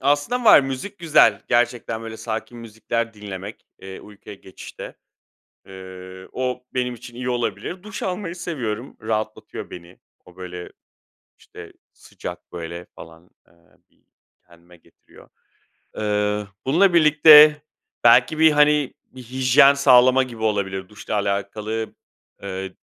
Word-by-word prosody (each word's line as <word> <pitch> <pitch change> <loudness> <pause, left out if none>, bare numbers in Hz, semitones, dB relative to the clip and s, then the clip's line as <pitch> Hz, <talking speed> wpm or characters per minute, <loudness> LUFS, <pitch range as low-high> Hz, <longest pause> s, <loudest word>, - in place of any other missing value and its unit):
Aslında 145 - 0
var, 210 - +8
müzik 135 +10 -6
güzel. 150 -11 +3
Gerçekten, 120 -1 0
böyle, 115 -1 -8
sakin 115 +2 -6
müzikler 115 +1 -4
dinlemek, 100 -1 -9
eee, 95 0 -10
uykuya 105 0 -13
geçişte. 95 - -11 0.7
Iıı, 95 0 -11
o 125 -1 -4
benim 125 -1 -2
için 120 +1 -13
iyi 125 +1 -4
olabilir. 125 +9 -4
Duş 210 -1 -8
almayı 180 -2 -4
seviyorum, 130 -9 -5
rahatlatıyor 110 0 -5
beni. 90 +1 -12 0.3
O, 90 0 -19
böyle, 90 -1 -9 0.7
işte, - - -13 0.2
sıcak, - - -10
böyle, 85 +1 -7
falan, 80 +2 -14 0.2
eee, - - -27 0.4
bir - - -38 0.4
kendime 85 +1 -20
getiriyor. - - -22 0.7
Eee, 105 -1 -1 0.2
bununla 175 +6 +3
birlikte 150 -1 +7 0.4
belki 125 +6 +5
bir, 160 0 +5
hani, 150 -1 +2
bir 130 -1 -14
hijyen 130 +3 +4
sağlama 130 -1 +5
gibi 120 -3 -8
olabilir. 95 -3 -2
Duşla 105 +1 -7
alakalı, 105 +2 -3 0.5
ııı, 95 -1 -6
115 Hz, 125 wpm, -21 LUFS, 100-140 Hz, 0.7 s, var